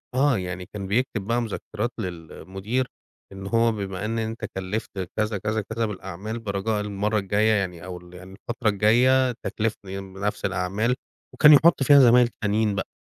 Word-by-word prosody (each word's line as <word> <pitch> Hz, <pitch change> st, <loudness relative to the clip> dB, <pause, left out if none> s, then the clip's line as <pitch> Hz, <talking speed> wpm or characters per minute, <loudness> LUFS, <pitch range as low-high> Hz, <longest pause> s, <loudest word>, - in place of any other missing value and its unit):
آه، 135 Hz, -2 st, +3 dB
يعني 90 Hz, -1 st, -5 dB
كان 100 Hz, 0 st, -7 dB
بيكتب 110 Hz, +1 st, 0 dB
بقى 120 Hz, +1 st, +1 dB
مذكرات 110 Hz, 0 st, -4 dB
للمدير، 95 Hz, +6 st, -4 dB, 0.4 s
إن 95 Hz, 0 st, -8 dB
هو 115 Hz, +2 st, +3 dB
بما 100 Hz, -2 st, -4 dB
إن 115 Hz, +1 st, -2 dB
أنتَ 110 Hz, +1 st, -4 dB
كلّفت 95 Hz, +4 st, -3 dB, 0.3 s
كذا، 105 Hz, -1 st, 0 dB
كذا، 110 Hz, +3 st, -1 dB
كذا 115 Hz, +3 st, -3 dB
بالأعمال 100 Hz, +2 st, -6 dB
برجاء 105 Hz, 0 st, -2 dB
المرة 105 Hz, +1 st, -1 dB
الجاية 105 Hz, +3 st, +2 dB
يعني 90 Hz, -4 st, -2 dB
أو 90 Hz, -1 st, -6 dB
ال 90 Hz, 0 st, -15 dB
يعني 90 Hz, +1 st, -11 dB
الفترة 120 Hz, +3 st, -2 dB
الجاية 125 Hz, +6 st, +4 dB
تكلّفني 100 Hz, -3 st, -3 dB
بنفس 95 Hz, +2 st, -4 dB
الأعمال 105 Hz, +7 st, 0 dB, 0.4 s
وكان 150 Hz, 0 st, +7 dB
يحط 150 Hz, 0 st, +5 dB
فيها 140 Hz, +1 st, +7 dB
زمايل 125 Hz, -1 st, +6 dB
تانيين 105 Hz, 0 st, +1 dB
بقى، 95 Hz, -, -3 dB
105 Hz, 160 wpm, -24 LUFS, 95-115 Hz, 0.4 s, وكان